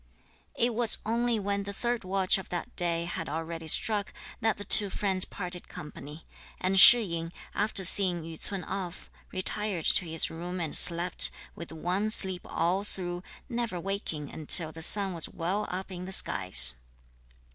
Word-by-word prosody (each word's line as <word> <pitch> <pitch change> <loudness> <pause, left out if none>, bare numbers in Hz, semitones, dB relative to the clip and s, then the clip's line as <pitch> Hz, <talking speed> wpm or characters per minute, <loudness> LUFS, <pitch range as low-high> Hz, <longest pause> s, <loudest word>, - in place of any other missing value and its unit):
It 240 0 0
was 230 -1 +3
only 235 +1 -1
when 200 0 -3
the 200 0 -7
third 240 +3 -3
watch 190 0 0
of 190 - -11
that 175 - -6
day 170 -1 -1
had 170 - -5
already 165 +1 -6
struck 205 +5 +1 0.3
that 225 -2 -1
the 205 - -7
two 205 -2 +8
friends 190 -1 -1
parted 180 0 -7
company; 150 +1 -11 0.3
and 190 +1 0
Shih 235 +5 +8
yin, 165 -3 -5 0.2
after 205 -2 -2
seeing 180 -2 +1
Yü 160 0 -10
ts'un 195 -3 -6
off, 185 -3 -7 0.2
retired 185 -2 -3
to 185 - +3
his 160 -1 +2
room 175 +3 -7
and 160 -3 -4
slept, 170 +1 +3 0.2
with 170 - -10
one 180 +6 -3
sleep 190 -4 -1
all 175 +4 -2
through, 175 -3 -6 0.3
never 235 -7 -4
waking 170 -6 -5
until 160 +1 0
the 160 +1 -11
sun 195 +2 +8
was 165 -2 -2
well 185 +6 -4
up 190 +2 -6
in 180 0 -7
the 190 - -8
skies. 90 - +4
185 Hz, 170 wpm, -27 LUFS, 170-200 Hz, 0.3 s, two